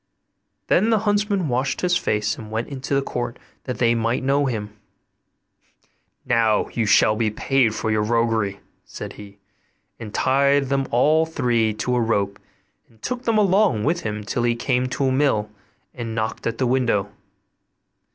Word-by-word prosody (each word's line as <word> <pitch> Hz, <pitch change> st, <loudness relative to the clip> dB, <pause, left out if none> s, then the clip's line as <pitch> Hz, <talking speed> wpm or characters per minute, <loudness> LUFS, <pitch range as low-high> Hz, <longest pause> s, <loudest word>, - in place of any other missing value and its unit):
Then 220 Hz, -, +3 dB
the 225 Hz, -, +4 dB
huntsman 205 Hz, -3 st, +1 dB
washed 130 Hz, +1 st, -1 dB
his 180 Hz, -1 st, +2 dB
face 105 Hz, -10 st, 0 dB
and 110 Hz, -2 st, -10 dB
went 110 Hz, +2 st, -3 dB
into 140 Hz, 0 st, -3 dB
the 140 Hz, -, +1 dB
court 120 Hz, -2 st, -4 dB, 0.3 s
that 125 Hz, -, -4 dB
they 120 Hz, -1 st, +3 dB
might 115 Hz, +2 st, 0 dB
know 140 Hz, +1 st, +2 dB
him. 105 Hz, -4 st, -4 dB, 1.5 s
'Now 115 Hz, -3 st, +2 dB
you 115 Hz, -3 st, 0 dB
shall 105 Hz, +1 st, +4 dB
be 110 Hz, 0 st, +1 dB
paid 115 Hz, +1 st, +1 dB
for 110 Hz, -, -2 dB
your 110 Hz, 0 st, +1 dB
roguery,' 110 Hz, -3 st, 0 dB, 0.2 s
said -, -, -8 dB
he; 100 Hz, -1 st, -12 dB, 0.6 s
and 110 Hz, -2 st, -7 dB
tied 140 Hz, +3 st, +2 dB
them 135 Hz, -1 st, 0 dB
all 155 Hz, +7 st, +3 dB
three 120 Hz, -8 st, +1 dB
to 125 Hz, +3 st, -1 dB
a 120 Hz, -, +2 dB
rope 100 Hz, -3 st, 0 dB, 0.5 s
and 115 Hz, -, -25 dB
took 250 Hz, 0 st, -4 dB
them 230 Hz, -2 st, +2 dB
along 195 Hz, -, +3 dB
with 170 Hz, +7 st, +1 dB
him 105 Hz, -1 st, -4 dB
till 110 Hz, +4 st, -2 dB
he 120 Hz, 0 st, +1 dB
came 125 Hz, +1 st, 0 dB
to 135 Hz, -, -1 dB
a 130 Hz, -, +2 dB
mill 130 Hz, -6 st, +1 dB, 0.4 s
and 115 Hz, -2 st, -5 dB
knocked 110 Hz, 0 st, -3 dB
at 115 Hz, 0 st, -2 dB
the 130 Hz, -, 0 dB
window. 120 Hz, -5 st, +1 dB
120 Hz, 170 wpm, -22 LUFS, 110-140 Hz, 1.5 s, the